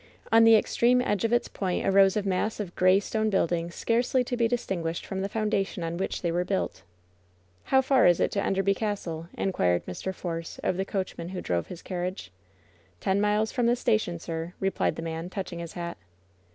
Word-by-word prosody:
On 225 Hz, 0 st, +7 dB
the 225 Hz, 0 st, +8 dB
extreme 240 Hz, +3 st, +3 dB
edge 205 Hz, -6 st, 0 dB
of 230 Hz, -, +1 dB
its 240 Hz, -, +2 dB
point 185 Hz, -3 st, -2 dB
arose 195 Hz, 0 st, +5 dB
a 210 Hz, -, 0 dB
mass 195 Hz, +3 st, -1 dB
of 190 Hz, -4 st, -5 dB
gray 185 Hz, +1 st, +5 dB
stone 220 Hz, +1 st, -1 dB
buildings 170 Hz, -3 st, 0 dB
scarcely 245 Hz, +2 st, +1 dB
to 245 Hz, -, -3 dB
be 235 Hz, -1 st, +2 dB
distinguished 175 Hz, -8 st, -2 dB
from 190 Hz, 0 st, -4 dB
the 195 Hz, -, -2 dB
foundation 205 Hz, -4 st, -1 dB
on 165 Hz, +1 st, -3 dB
which 190 Hz, -, -3 dB
they 170 Hz, -, +1 dB
were 175 Hz, +1 st, +1 dB
built. 190 Hz, -, -2 dB, 0.8 s
"How 265 Hz, 0 st, +4 dB
far 265 Hz, -4 st, +4 dB
is 175 Hz, -1 st, +4 dB
it -, -, +1 dB
to 200 Hz, -, -1 dB
Enderby 195 Hz, 0 st, +2 dB
Castle?" 185 Hz, -6 st, -3 dB
inquired 90 Hz, -, +1 dB
Mr. 140 Hz, -, -4 dB
Force 165 Hz, -3 st, -5 dB
of -, -, +1 dB
the 190 Hz, -, -1 dB
coachman 185 Hz, -3 st, -4 dB
who 185 Hz, -1 st, -5 dB
drove 85 Hz, -1 st, -1 dB
his 180 Hz, -, -9 dB
carriage. 180 Hz, -, -4 dB, 0.7 s
"Ten 190 Hz, -, +1 dB
miles 210 Hz, +1 st, +2 dB
from 245 Hz, -2 st, +1 dB
the 240 Hz, -, +4 dB
station, 215 Hz, -8 st, 0 dB
sir," 165 Hz, +1 st, -5 dB
replied 195 Hz, 0 st, 0 dB
the -, -, -6 dB
man, 165 Hz, +1 st, -4 dB
touching 185 Hz, -3 st, -5 dB
his 170 Hz, -1 st, -7 dB
hat. 170 Hz, -1 st, -5 dB
190 Hz, 200 wpm, -27 LUFS, 170-215 Hz, 0.8 s, the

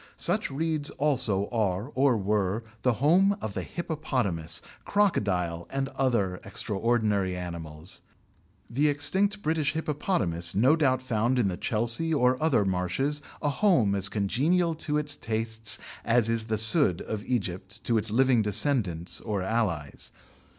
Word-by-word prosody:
Such -, -, +2 dB
reeds 155 Hz, +1 st, -1 dB
also 120 Hz, -9 st, +1 dB
are 105 Hz, +1 st, -1 dB
or 130 Hz, -3 st, +3 dB
were 105 Hz, +1 st, 0 dB, 0.2 s
the 125 Hz, -, +2 dB
home 180 Hz, -, +3 dB
of 110 Hz, -, -5 dB
the -, -, -3 dB
hippopotamus, 130 Hz, -, -2 dB, 0.2 s
crocodile, 90 Hz, -, 0 dB
and 135 Hz, 0 st, -2 dB
other 105 Hz, -11 st, 0 dB
extraordinary 105 Hz, -4 st, 0 dB
animals. 85 Hz, -1 st, -6 dB, 0.7 s
The 140 Hz, +6 st, +1 dB
extinct 200 Hz, +8 st, 0 dB
British 155 Hz, -2 st, 0 dB
hippopotamus 145 Hz, -, -1 dB
no 130 Hz, +10 st, +5 dB
doubt 130 Hz, -5 st, +1 dB
found 120 Hz, 0 st, 0 dB
in 110 Hz, -6 st, +2 dB
the 90 Hz, -, -3 dB
Chelsea 120 Hz, +9 st, 0 dB
or 125 Hz, -1 st, +2 dB
other 135 Hz, -10 st, +2 dB
marshes 95 Hz, +11 st, 0 dB, 0.2 s
a 145 Hz, -, +2 dB
home 140 Hz, -, +3 dB
as 95 Hz, -1 st, +1 dB
congenial 155 Hz, -, +1 dB, 0.2 s
to 150 Hz, -, +2 dB
its 150 Hz, -1 st, 0 dB
tastes 110 Hz, -2 st, -1 dB, 0.3 s
as 115 Hz, -1 st, +2 dB
is 115 Hz, -1 st, 0 dB
the 110 Hz, -1 st, -1 dB
sudd 105 Hz, -5 st, +3 dB
of 105 Hz, -1 st, -5 dB
Egypt 100 Hz, -2 st, -3 dB
to 115 Hz, -2 st, +2 dB
its 110 Hz, -, -1 dB
living 125 Hz, +1 st, +3 dB
descendants 100 Hz, -, 0 dB
or 105 Hz, -4 st, -2 dB
allies. 95 Hz, -9 st, -2 dB
115 Hz, 140 wpm, -27 LUFS, 100-145 Hz, 0.7 s, no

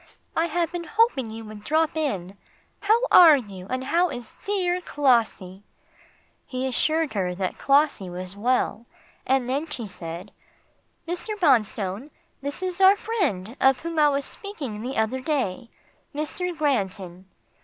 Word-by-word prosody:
I 325 Hz, -, +2 dB
have 340 Hz, -1 st, -1 dB
been 345 Hz, -1 st, -4 dB
hoping 440 Hz, -, +2 dB
you 225 Hz, +1 st, -8 dB
would 215 Hz, -1 st, -10 dB
drop 315 Hz, +6 st, +1 dB
in. 200 Hz, -, -2 dB, 0.4 s
How 440 Hz, +3 st, +3 dB
are 325 Hz, -5 st, +9 dB
you, 195 Hz, -7 st, -8 dB
and 255 Hz, 0 st, -2 dB
how 345 Hz, +6 st, +2 dB
is 245 Hz, -5 st, -8 dB
dear 365 Hz, -3 st, 0 dB
Clossie?" 230 Hz, -, +1 dB, 0.9 s
He 255 Hz, 0 st, -3 dB
assured 310 Hz, +4 st, 0 dB
her 180 Hz, -3 st, -1 dB
that 185 Hz, 0 st, -3 dB
Clossie 280 Hz, -9 st, +2 dB
was 180 Hz, +2 st, -6 dB
well, 235 Hz, +1 st, 0 dB, 0.4 s
and 265 Hz, -1 st, +2 dB
then 280 Hz, +5 st, -1 dB
she 255 Hz, -7 st, -5 dB
said, 175 Hz, 0 st, -8 dB, 0.8 s
"Mr. 385 Hz, +5 st, -4 dB
Bonstone, 225 Hz, -, +1 dB, 0.3 s
this 285 Hz, +6 st, -4 dB
is 370 Hz, 0 st, -2 dB
our 385 Hz, +1 st, +8 dB
friend 270 Hz, -, -2 dB
of 265 Hz, -1 st, +4 dB
whom 330 Hz, -1 st, -3 dB
I 300 Hz, -1 st, +6 dB
was 280 Hz, 0 st, -1 dB
speaking 290 Hz, -, -7 dB
the 255 Hz, +3 st, -4 dB
other 220 Hz, +4 st, 0 dB
day 255 Hz, -, -2 dB, 0.5 s
Mr. 340 Hz, +3 st, -3 dB
Granton." 190 Hz, -, -2 dB
265 Hz, 145 wpm, -25 LUFS, 210-325 Hz, 0.9 s, are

